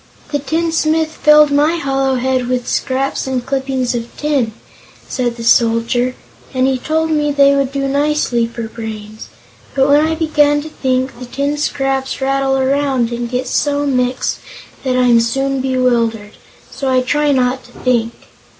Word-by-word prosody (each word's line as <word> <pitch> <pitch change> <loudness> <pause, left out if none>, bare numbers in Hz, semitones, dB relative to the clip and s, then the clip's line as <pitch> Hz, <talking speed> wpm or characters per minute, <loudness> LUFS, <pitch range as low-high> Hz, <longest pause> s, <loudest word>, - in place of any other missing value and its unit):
"The 290 - 0
tinsmith 320 +1 0
filled 300 -1 +5
my 295 +4 +3
hollow 270 -4 0
head 255 0 0
with 250 -1 -2
scraps 270 0 -1
and 255 -2 -2
clippings 265 -2 -1
of 235 -1 -4
tin," 285 -7 0 0.6
said 245 -3 -2
the 230 - -6
Soldier, 235 +2 +2 0.4
"and 255 0 +2
he 265 -1 +1
told 320 +4 -1
me 295 -1 +1
they 280 0 +4
would 275 -1 0
do 275 0 -2
nicely 280 -4 +1
for 235 0 -7
brains, 220 -1 -8 0.5
but 270 0 +3
when 290 +1 +5
I 320 +1 0
begin 295 -2 +2
to 315 - -8
think, 260 -3 -2
the 250 - -8
tin 280 +4 -2
scraps 270 -2 -2
rattle 270 0 +1
around 265 -2 +1
and 235 0 -3
get 250 +1 -2
so 290 +2 0
mixed 250 -2 0 0.4
that 255 -1 0
I'm 245 -2 +4
soon 270 +3 0
bewildered. 235 -5 0 0.4
So 270 - -3
I 255 -1 +3
try 295 +3 +1
not 255 -1 +1
to 245 - -17
think. 235 -2 0
265 Hz, 160 wpm, -16 LUFS, 245-285 Hz, 0.6 s, filled